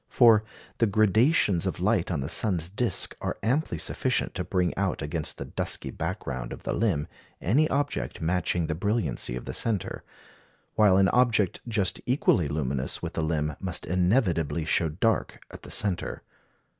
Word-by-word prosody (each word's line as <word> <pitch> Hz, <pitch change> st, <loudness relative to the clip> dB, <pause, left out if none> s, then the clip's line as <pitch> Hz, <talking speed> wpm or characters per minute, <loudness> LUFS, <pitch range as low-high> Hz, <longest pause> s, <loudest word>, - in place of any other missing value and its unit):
For 115 Hz, -4 st, +6 dB, 0.4 s
the 115 Hz, -, +4 dB
gradations 105 Hz, -, +3 dB
of 95 Hz, -, -3 dB
light 95 Hz, -1 st, +1 dB
on 80 Hz, -6 st, -1 dB
the 70 Hz, -, -3 dB
sun's 90 Hz, -1 st, 0 dB
disc 105 Hz, -2 st, +1 dB
are -, -, -3 dB
amply 135 Hz, +8 st, 0 dB
sufficient 125 Hz, -3 st, -1 dB
to 90 Hz, -, -3 dB
bring 90 Hz, -1 st, 0 dB
out 95 Hz, -5 st, -1 dB
against 75 Hz, +1 st, -2 dB
the -, -, -5 dB
dusky -, -, -2 dB
background 65 Hz, -3 st, -4 dB
of -, -, -8 dB
the -, -, -2 dB
limb 95 Hz, -10 st, 0 dB, 0.3 s
any 140 Hz, -, +2 dB
object 145 Hz, +1 st, -2 dB
matching 85 Hz, 0 st, 0 dB
the 80 Hz, -, -2 dB
brilliancy 90 Hz, -, -1 dB
of 65 Hz, -, -6 dB
the -, -, -5 dB
centre; 110 Hz, -5 st, -2 dB, 0.7 s
while 105 Hz, -3 st, +5 dB
an 95 Hz, -1 st, +4 dB
object 115 Hz, -6 st, +2 dB
just 105 Hz, -5 st, 0 dB
equally 120 Hz, -, +2 dB
luminous 70 Hz, -2 st, -2 dB
with -, -, -4 dB
the -, -, -1 dB
limb 75 Hz, -2 st, -1 dB
must 90 Hz, -3 st, -3 dB
inevitably 90 Hz, -, +1 dB
show 80 Hz, +1 st, +2 dB
dark 105 Hz, +9 st, 0 dB
at -, -, -10 dB
the -, -, -11 dB
centre. 100 Hz, -4 st, -2 dB
95 Hz, 165 wpm, -27 LUFS, 80-110 Hz, 0.7 s, For